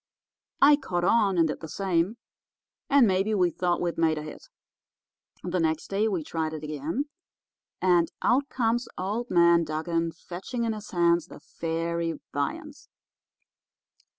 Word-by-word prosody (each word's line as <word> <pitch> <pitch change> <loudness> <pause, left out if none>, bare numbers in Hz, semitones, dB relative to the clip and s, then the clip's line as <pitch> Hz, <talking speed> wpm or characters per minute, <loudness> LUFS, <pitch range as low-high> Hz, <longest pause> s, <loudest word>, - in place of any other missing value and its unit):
I 290 +1 +8
caught 175 -11 -3
on 200 -2 +3
and 165 -1 +4
did 155 - -4
the 160 - -7
same, 185 +4 0 0.7
and 280 -3 +6
maybe 195 +2 +1
we 180 -3 +2
thought 175 +1 0
we'd 170 -1 -2
made 160 -1 +2
a 150 - -4
hit! 155 - -10 1.0
The 180 0 -1
next 160 -1 -1
day 205 +3 +2
we 185 -7 -1
tried 160 0 -3
it 155 -1 -6
again, 155 - -3 0.8
and 175 -2 +3
out 270 +3 +2
comes 240 0 0
old 210 +6 -3
man 170 -1 +5
Dugan 165 +2 -1
fetching 190 +9 -6
in 225 -1 0
his 210 -1 -8
hands 170 -1 +2
the - - -12
fairy 165 -1 -3
viands. 300 - -4
175 Hz, 150 wpm, -27 LUFS, 165-215 Hz, 1.0 s, I